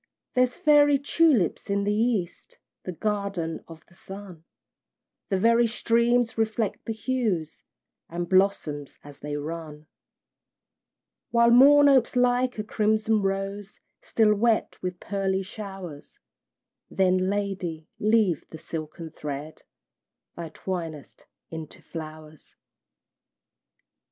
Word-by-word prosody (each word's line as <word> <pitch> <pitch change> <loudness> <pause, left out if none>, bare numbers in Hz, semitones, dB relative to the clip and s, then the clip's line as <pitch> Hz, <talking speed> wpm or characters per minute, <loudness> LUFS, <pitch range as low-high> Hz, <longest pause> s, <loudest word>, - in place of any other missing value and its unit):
There's 250 0 +2
fairy 290 -1 +5
tulips 280 - +2
in 200 0 +1
the 205 +1 +1
east, 215 -5 -1 0.3
The 185 - -3
garden 200 -4 -3
of 165 -1 -13
the - - -24
sun; 190 -2 -11 0.8
The 195 - +1
very 230 +4 +4
streams 235 +1 +1
reflect 220 -1 -1
the - - -3
hues, 220 - -2 0.5
And 175 +1 -4
blossom 185 -6 +1 0.2
as 145 -1 -13
they 145 0 -4
run: 155 0 -7 1.4
While 235 0 +4
Morn 285 +4 +8
opes 260 -4 +4
like 250 0 +2
a 215 - -2
crimson 215 0 +1
rose, 195 +1 -3 0.2
Still 215 -2 +3
wet 220 +2 +1
with 180 -1 -4
pearly 195 -1 -1
showers; 190 -6 -9 0.7
Then, 185 0 +2
lady, 190 -6 -3
leave 210 -6 +2
the 160 - -9
silken 160 0 -7
thread 150 +1 -7 0.7
Thou 170 -2 -6
twinest 165 -6 -6 0.2
into 160 -2 -8
flowers! 155 -2 -10
195 Hz, 110 wpm, -26 LUFS, 165-230 Hz, 1.4 s, Morn